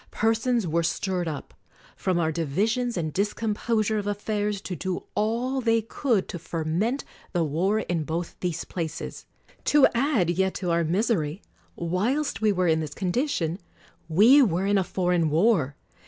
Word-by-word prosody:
Persons 225 0 +1
were 170 0 +1
stirred 180 +1 -1
up, 150 -4 -6 0.4
from 185 -2 0
our 160 -2 +1
divisions 205 - 0
and 155 -3 -2
discom 210 +2 0
posure 215 0 0
of 205 - -4
affairs, 205 0 -1
to 185 - -5
do 185 +3 -3
all 240 +5 0
they 230 -2 +2
could 225 -3 0
to 175 - -5
ferment 170 - -1 0.3
the 175 -2 +2
war 180 +8 +1
in 170 -5 -2
both 165 +2 -4
these 175 -2 -2
places. 165 -3 -5 0.4
To 295 -2 +6
add 235 - +2
yet 190 +2 0
to 180 -3 -2
our 170 0 +2
misery, 175 -1 0 0.3
whilst 215 - -1
we 215 -1 +4
were 185 -2 +1
in 160 -1 +3
this 150 -2 -5
condition, 185 - -1 0.5
we 225 - +7
were 190 -6 +2
in 200 0 +3
a - - +1
foreign 175 -3 +1
war. 160 - +2
190 Hz, 160 wpm, -26 LUFS, 170-225 Hz, 0.5 s, we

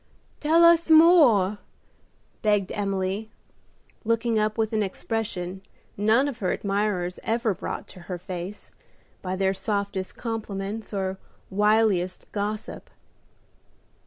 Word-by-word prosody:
"Tell 320 +3 +4
us 335 0 +5
more;" 290 - +6 0.8
begged 205 -3 +1
Emily, 195 +1 -2 0.7
looking 230 0 +1
up 215 +1 0
with 220 0 0
an 215 - +1
expression 195 -2 -3 0.3
none 220 +7 +3
of 260 -4 -5
her 185 -3 0
admirers 195 -3 -1
ever 225 -1 0
brought - - -6
to - - -12
her 180 - -3
face 180 +2 -7 0.5
by 185 0 -3
their 190 0 +1
softest 200 -2 -3
compliments 215 -2 -4
or 190 -2 -3 0.3
wiliest 205 -3 +2
gossip. 210 +1 -4
210 Hz, 110 wpm, -25 LUFS, 190-225 Hz, 0.8 s, more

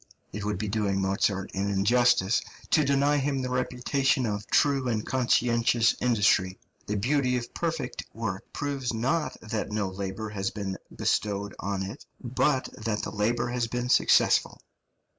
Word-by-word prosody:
It 105 - -4
would 105 0 -1
be 110 - -3
doing 100 -2 0
Mozart 95 0 0
an 100 +1 -1
injustice 105 +1 +3 0.3
to 155 - +5
deny 140 +1 +3
him 135 -1 0
the 125 - -3
reputation 125 +1 +1
of 105 -2 -3
true 140 -3 +2
and 110 -3 -1
conscientious 120 -2 +2
industry; 105 -6 +2 0.3
the 105 - -1
beauty 125 +4 +1
of 120 -1 -6
perfect 160 -7 -3
work 100 -4 -5
proves 140 -4 -2
not 135 +8 -1
that 110 -1 -3
no 105 -2 -1
labour 95 +3 -5
has 95 -2 -2
been 95 -2 -5 0.2
bestowed 100 -1 -1
on 100 0 -2
it, 100 +8 -7 0.2
but 130 +2 0
that 110 -1 -1
the - - -4
labour 120 +3 0
has 120 -1 -1
been 125 +1 -3
successful. - - +4
115 Hz, 155 wpm, -27 LUFS, 100-125 Hz, 0.3 s, to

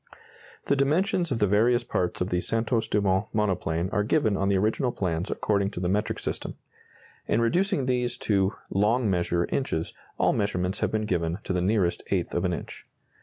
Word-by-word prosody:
The 140 - +2
dimensions 170 +5 +1
of 125 - +1
the 105 - +3
various 115 +5 +3
parts 90 -7 -2
of 90 - 0
the 90 0 +1
Santos 115 +1 0
Dumont 100 0 +1
monoplane 90 -5 0
are 105 - +1
given 110 -1 +2
on 95 0 0
the 100 - +3
original 110 +6 +1
plans 90 -3 -2
according 100 -2 0
to 100 - -7
the 90 - -1
metric 105 +3 0
system. - - -4 0.7
In 110 - +2
reducing 170 - +1
these 125 -1 0
to 100 -1 +2 0.2
"long 105 +3 +2
measure" 85 -1 +1
inches, 80 -12 -1 0.2
all - - +3
measurements 95 -2 -1
have - - 0
been 110 0 -1
given 85 -4 -1
to - - -2
the 90 - 0
nearest 95 -2 +1
eighth - - -1
of - - 0
an - - +1
inch. - - -7
105 Hz, 185 wpm, -26 LUFS, 90-120 Hz, 0.7 s, the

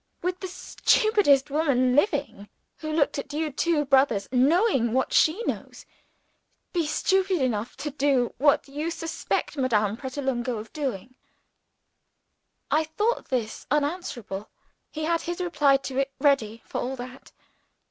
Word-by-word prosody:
Would 360 +1 -1
the 375 - -5
stupidest 360 - +2
woman 265 -5 +2
living, 280 - 0 0.3
who 310 -1 -5
looked 300 -2 +1
at 285 - -7
you 310 0 -1
two 300 +1 +1
brothers 265 -7 +3
(knowing 265 - +3
what 260 +1 0
she 345 +9 +3
knows), - - -5 0.9
be 340 -4 0
stupid 380 +3 +1
enough 240 -3 -2
to 295 +2 -4
do 270 -3 +1
what 285 0 +3
you 295 +4 -3
suspect 330 -2 -3
Madame 215 -6 +1
Pratolungo 260 -2 -3
of 215 +1 -9
doing?" 255 -6 -4 1.6
I 310 +1 +3
thought 420 +10 -1
this 240 -5 -3
unanswerable. 285 - -2 0.4
He 310 - -5
had 335 +1 +1
his 345 +1 -4
reply 295 -6 +3
to 270 -1 -4
it 275 0 0
ready, 235 -6 +1
for - - -4
all 260 +2 -3
that. 255 +1 -10
280 Hz, 135 wpm, -26 LUFS, 255-320 Hz, 1.6 s, brothers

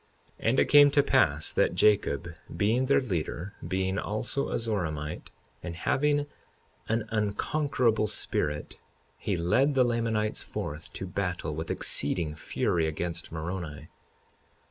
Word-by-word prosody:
52:33 - - +2
And 130 - +3
it - - +5
came 145 -1 +8
to 145 0 +4
pass 75 - +2
that - - +2
Jacob, 105 -4 +2 0.3
being 115 +7 +2
their 140 - +4
leader, 90 - -3
being 95 +2 0
also 115 +6 -2
a - - -1
Zoramite, 80 -10 -3 0.3
and 85 -2 -6
having 145 - +1 0.6
an 115 0 +1
unconquerable 110 +2 +1
spirit, 75 -7 -2 0.4
he 100 - -1
led 125 - +2
the 130 - +5
Lamanites 115 -3 0
forth 75 +3 -6
to 95 - -5
battle 90 -4 -2
with 80 +2 -5
exceeding 75 +1 0
fury 80 +1 0
against 85 +2 -3
Moroni. 80 -1 -5
100 Hz, 130 wpm, -28 LUFS, 80-115 Hz, 0.6 s, came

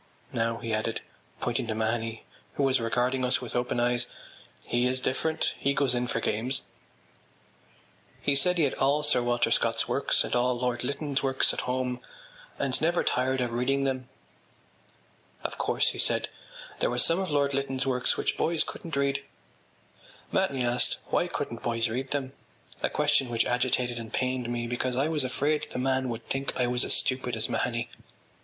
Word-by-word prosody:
Now,” 115 0 0
he 115 -1 -4
added, 110 +1 -1 0.4
pointing 120 -1 -1
to 110 - -2
Mahony 110 0 -2 0.3
who 140 - 0
was 130 -2 +3
regarding 125 +3 0
us 125 +1 +4
with 125 - -5
open 120 0 0
eyes, 120 0 +2 0.6
“he 120 +1 +1
is 130 +1 0
different; 155 +5 0
he 140 0 +1
goes 135 -3 +3
in 125 0 0
for 115 - -1
games.” 115 +4 0 1.6
He 140 - +2
said 180 +6 +4
he 165 - +3
had 140 - +2
all 145 +3 +2
Sir 145 -4 +4
Walter 120 -1 +1
Scott’s - - +2
works - - +2
and - - -2
all 125 0 +2
Lord 125 -1 -1
Lytton’s 140 +1 -1
works 135 -1 +2
at - - -4
home 125 -1 -1 0.6
and 135 -2 0
never 170 +2 +2
tired 130 +1 +1
of 120 -2 -2
reading 135 +3 +1
them. 130 -2 -2 1.3
“Of - - -4
course,” - - +3
he - - -4
said, - - +2 0.5
“there - - +2
were 120 - -2
some 165 +8 +4
of 190 -2 -2
Lord 140 -1 +1
Lytton’s 135 -1 0
works 125 -2 +2
which - - -1
boys 165 -1 +3
couldn’t 165 -4 -7
read.” 140 0 0 1.1
Mahony 130 -3 +1
asked 120 +1 +2
why - - +2
couldn’t 115 - -4
boys 115 -2 0
read 130 +4 -3
them—a 135 -2 -5
question 145 -3 +2
which 115 -1 +1
agitated 125 -1 0
and 115 -1 -8
pained 130 -2 -1
me 120 -1 -2
because 120 +1 -2
I 140 +4 +2
was 155 -3 +2
afraid 145 +4 0
the - - -6
man 130 0 0
would 115 -1 -5
think 135 +1 -2
I 125 - +3
was 125 +1 +2
as - - +4
stupid 130 -2 0
as 110 0 -1
Mahony. 120 -1 -1
125 Hz, 180 wpm, -28 LUFS, 120-135 Hz, 1.6 s, us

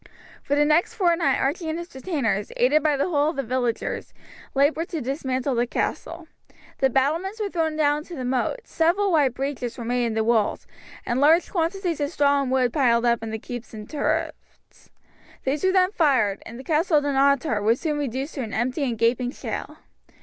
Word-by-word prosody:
For 285 - -1
the 295 0 +3
next 305 +3 +2
fortnight 335 -7 +2
Archie 315 +4 -1
and 315 - -2
his 345 +1 -8
retainers, 265 - -2
aided 285 +5 +4
by 295 -1 +2
the 280 - 0
whole 295 -2 +2
of 320 - -4
the 275 - -2
villagers, 245 -1 -2 0.4
laboured 305 +5 +2
to 330 - -3
dismantle 265 0 -2
the 240 0 +1
castle. 330 +7 -3 0.5
The 265 - +3
battlements 320 - 0
were 410 -2 -2
thrown 320 -3 -1
down 295 -1 +2
into 335 +3 -9
the 255 -4 -5
moat, 260 - -1
several 375 +4 +1
wide 285 -7 +3
breaches 265 -3 -4
were 235 - -6
made 245 0 0
in 225 - -3
the 220 - +1
walls, 220 -2 +1 0.4
and 245 +2 0
large 320 +4 +4
quantities 345 -1 -1
of 285 - 0
straw 285 -3 +2
and 270 - -2
wood 255 -2 +1
piled 240 -5 +3
up 235 -1 +2
in 225 - -5
the 220 - -3
keep 245 +2 -7
and 215 -1 -8
turrets. 310 +2 -4 0.5
These 280 +2 -1
were 375 - +4
then 370 0 +3
fired, 260 - +2
and 235 - -9
the - - -8
Castle 315 +2 +2
of 290 - +2
Dunottar 275 -4 +2
was 225 +4 +2
soon 300 -3 -1
reduced 270 +2 -3
to 275 - -4
an 225 -3 -5
empty 250 +5 -1
and 240 -4 -1
gaping 245 +2 +1
shell. - - -6
280 Hz, 200 wpm, -24 LUFS, 245-320 Hz, 0.5 s, aided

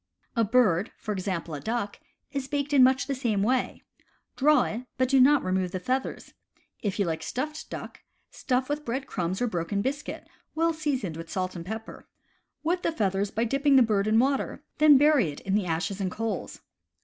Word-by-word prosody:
A 230 - +3
bird, 215 -4 +3
for 215 - -5
example 185 -4 -3
a 145 - -4
duck, 220 -2 -3 0.3
is 275 -2 -3
baked 285 0 -2
in 275 - +6
much 260 +1 +4
the 280 - -2
same 230 -7 0
way. 250 +3 0 0.5
Draw 295 +2 +4
it, 225 - -3 0.2
but 255 -1 +1
do 270 0 +5
not 280 +3 +5
remove 185 0 0
the 185 - -4
feathers. 255 +8 -3 0.5
If 205 -3 -2
you 200 - +1
like 160 -2 -2
stuffed 305 +5 -4
duck, - - -7 0.3
stuff 255 0 -1
with 295 +1 -2
bread 265 +1 -3
crumbs 185 +2 -2
or - - +3
broken 200 -1 -2
biscuit, 285 +3 -4 0.3
well 330 +1 +2
seasoned 270 - -2
with 165 0 -8
salt 185 -1 -3
and 170 - -6
pepper. 220 +2 -7 0.6
Wet 350 +3 0
the - - 0
feathers 200 - 0
by 225 +3 -1
dipping 275 +4 +2
the 260 - +8
bird 210 -3 +1
in 215 +1 +3
water; 270 +3 +1 0.2
then 300 -2 +8
bury 285 - +4
it 145 - -7
in 195 - -2
the 200 -3 +1
ashes 175 +4 -2
and 190 - 0
coals. 220 0 -4
230 Hz, 195 wpm, -27 LUFS, 195-275 Hz, 0.6 s, the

